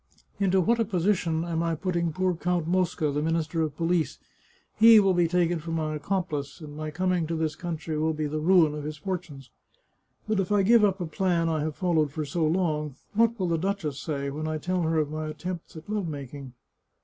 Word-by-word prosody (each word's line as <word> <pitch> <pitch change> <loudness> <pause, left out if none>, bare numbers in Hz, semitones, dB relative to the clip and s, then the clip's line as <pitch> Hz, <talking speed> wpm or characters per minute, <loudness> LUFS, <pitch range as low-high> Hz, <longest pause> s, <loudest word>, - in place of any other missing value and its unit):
" - - -38
Into 190 -1 +3
what 230 +6 +2
a - - +4
position 175 -4 0
am 165 -1 -1
I 165 -1 0
putting 170 -1 -1
poor 185 +2 0
Count 175 0 -1
Mosca, 175 -3 +1
the 145 +1 -1
Minister 165 +1 0
of 150 -2 -2
Police? 170 -1 0 0.6
He 225 0 +9
will 195 -2 +3
be 175 -1 +3
taken 175 0 +1
for 160 +2 -8
my 160 -2 -1
accomplice, 155 -3 -3
and 150 -3 -9
my 155 0 -4
coming 180 +1 0
to 165 - -2
this 160 -2 -1
country 165 -3 -4
will 160 +1 +1
be 155 0 -2
the 150 +1 -2
ruin 165 -2 +4
of 150 -1 -5
his 155 +1 -5
fortunes. 155 -6 -6 0.8
But 215 -2 +1
if 195 +1 -1
I 205 -1 +4
give 225 +2 +5
up 195 -2 +2
a - - -1
plan 170 0 0
I 160 -1 0
have 155 0 -2
followed 160 -6 +1
for 155 +1 -3
so 160 +4 -1
long, 155 -4 0 0.2
what 230 +1 +2
will 185 - 0
the 165 -1 +1
duchess 175 -6 -2
say 140 -1 -3
when 155 +2 -4
I 155 0 -1
tell 180 +3 -1
her 160 -1 +1
of 150 -1 0
my 155 0 -3
attempts 175 +3 -6
at 160 - -10
love 205 -4 -2
making? 140 -3 -7
165 Hz, 220 wpm, -27 LUFS, 155-185 Hz, 0.8 s, He